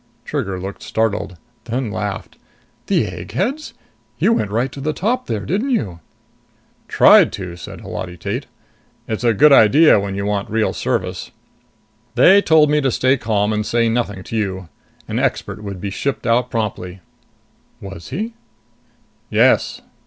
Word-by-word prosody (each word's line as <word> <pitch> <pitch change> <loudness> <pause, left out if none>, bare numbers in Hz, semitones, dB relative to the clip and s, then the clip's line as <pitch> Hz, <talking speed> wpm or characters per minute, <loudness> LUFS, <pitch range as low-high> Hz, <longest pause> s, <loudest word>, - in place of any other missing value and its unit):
Trigger 95 -1 -3
looked 95 +2 -7
startled, 105 -5 -2 0.3
then 120 -1 -3
laughed. 105 -2 -5 0.5
"The - - +2
eggheads? 190 - -4 0.4
You 230 - +3
went 105 - -1
right 120 +5 -1
to 140 - -8
the 155 +2 -1
top 245 +9 -1
there, 105 -3 -3
didn't 205 - -1
you?" 105 - -1 0.9
"Tried - - +6
to," 90 -3 -6
said 85 - -10
Holati 90 -1 -6
Tate. - - -4 0.6
"It's 110 +1 -3
a 115 -2 +3
good 150 +7 +6
idea 135 +3 +6
when 100 -1 -4
you 100 0 -3
want 100 -1 -2
real 110 0 0
service. - - -3 0.9
They 190 +11 +6
told 155 -4 +4
me 150 0 +3
to 135 - +1
stay 130 +2 +2
calm 105 -4 0
and 105 0 -1
to - - -6
say 115 -1 +2
nothing 105 -5 -2
to 115 - -7
you. 95 -5 -3 0.4
An - - -2
expert 100 +1 -2
would 100 -2 -6
be 100 +1 -4
shipped 140 +8 -3
out 120 +2 +2
promptly." 95 -5 -4 0.8
"Was 95 -4 -9
he?" 225 +4 -4 1.0
"Yes." - - +2
110 Hz, 155 wpm, -19 LUFS, 100-135 Hz, 1.0 s, Tried